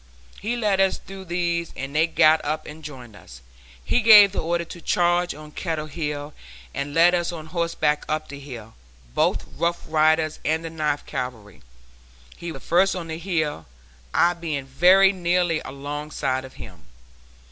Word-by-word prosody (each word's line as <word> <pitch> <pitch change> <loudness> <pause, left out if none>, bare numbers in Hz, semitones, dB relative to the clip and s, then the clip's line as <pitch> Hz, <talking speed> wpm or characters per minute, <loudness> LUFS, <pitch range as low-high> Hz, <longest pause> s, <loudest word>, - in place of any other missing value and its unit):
He 220 +5 -1
led 205 -4 +2
us 190 -1 +2
through 195 0 -11
these 170 -1 -1
and 135 +2 -6
they 160 +2 +4
got 160 -1 +4
up 155 +1 -2
and 155 +1 -10
joined 125 -7 -10
us. - - -14 0.4
He - - +2
gave 210 -3 +9
the - - -3
order 170 +1 -1
to 170 +1 -10
charge 175 -1 +1
on 150 0 -11
Kettle 160 -2 -3
Hill, 150 -1 -5 0.4
and 145 +1 -4
led 170 +2 +6
us 175 0 0
on 160 -3 -7
horseback 160 -3 -1
up 155 0 -2
the 140 - -9
hill, 120 -6 -10 0.4
both - - +1
Rough 170 0 -1
Riders 155 0 +2
and 160 +1 0
the 165 - -5
Ninth 150 -2 -2
Cavalry. 115 - -6 0.7
He 170 0 -6
was 135 - -10
the - - -17
first 190 +3 +3
on 170 -3 -6
the 160 0 -5
hill, 155 - -2 0.4
I 175 - +3
being 155 -5 -4
very 185 +8 +5
nearly 175 -2 +1
alongside 140 -1 -4
of 130 - -13
him. 90 - -12
160 Hz, 170 wpm, -23 LUFS, 145-175 Hz, 0.7 s, gave